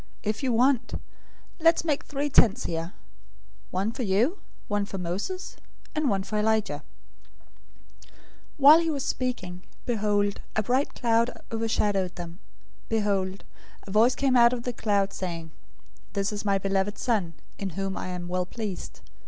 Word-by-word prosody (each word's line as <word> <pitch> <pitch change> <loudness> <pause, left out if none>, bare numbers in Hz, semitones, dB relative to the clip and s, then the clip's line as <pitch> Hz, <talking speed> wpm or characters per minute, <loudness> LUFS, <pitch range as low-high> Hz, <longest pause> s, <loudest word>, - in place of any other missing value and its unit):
If 215 0 -1
you 265 -2 +1
want, 250 +2 +2 0.6
let's 330 0 +4
make 295 -3 0
three 290 0 -2
tents 245 -4 +5
here: 165 +1 -3 0.8
one 195 +4 -1
for 240 - -6
you, 235 - +2 0.3
one 205 -1 +1
for 200 -1 -5
Moses, 190 - -4 0.4
and 305 -3 +1
one 195 -2 +1
for 210 +2 -2
Elijah." 220 0 +1 1.3
017:005 - - -28 0.5
While 290 +3 +9
he 335 -1 0
was 285 -4 -1
still - - -1
speaking, 185 -9 -3 0.2
behold, 205 -3 +1
a 215 - +2
bright 255 +6 +1
cloud 230 0 +2 0.2
overshadowed 210 -5 0
them. 175 0 -7 0.5
Behold, 200 -3 0 0.4
a 195 - -8
voice 230 +5 +5
came 270 -2 +2
out 235 0 +7
of 240 -1 -3
the 245 - -2
cloud, 200 -3 +1
saying, 165 -3 -5 0.6
"This 200 0 0
is 205 - -3
my 200 -1 +2
beloved 195 +1 0
Son, 200 -10 0 0.2
in 195 -2 -3
whom 195 -1 -2
I - - -4
am 180 -1 -4
well 180 0 -1
pleased. 210 -4 -6
210 Hz, 155 wpm, -27 LUFS, 195-245 Hz, 1.3 s, While